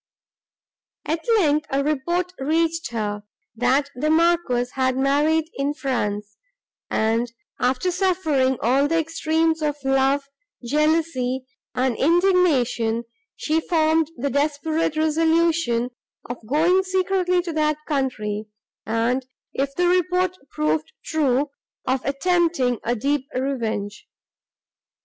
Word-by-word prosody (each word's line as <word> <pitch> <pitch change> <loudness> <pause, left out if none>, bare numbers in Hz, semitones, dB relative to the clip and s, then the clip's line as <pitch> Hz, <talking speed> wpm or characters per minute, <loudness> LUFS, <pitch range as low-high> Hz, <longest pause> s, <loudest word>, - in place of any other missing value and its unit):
At 320 +2 -2
length, 305 -5 +2
a 275 -1 0
report 345 +5 -1
reached 325 +2 0
her, 210 -3 -3 0.3
that 265 +4 +1
the 295 +5 -1
Marquis 315 -7 +2
had 260 -1 0
married 295 +4 +2
in 280 +1 -2
France, 210 -7 -3 0.5
and, 230 +2 0 0.3
after 260 +8 +1
suffering 320 -8 +1
all 270 +5 +3
the 330 +2 +1
extremes 320 0 0
of 295 -1 0
love, 270 +1 +2 0.4
jealousy 295 -2 +1 0.3
and 255 -1 +1
indignation, 290 -10 +2 0.3
she 320 +1 0
formed 320 -1 +2
the 280 +3 -2
desperate 305 +2 0
resolution 320 -5 +2 0.4
of 245 -1 -7
going 335 - +3
secretly 370 -1 +1
to 340 -2 -4
that 305 -1 +1
country, 215 -8 -2 0.4
and, 235 +4 0 0.3
if 275 0 -2
the 355 0 +2
report 365 +1 +2
proved 155 0 -1
true, 285 -2 +1 0.3
of 260 0 0
attempting 280 - +1
a 240 - 0
deep 280 +3 -1
revenge. 225 -6 -3
285 Hz, 110 wpm, -23 LUFS, 250-330 Hz, 0.5 s, all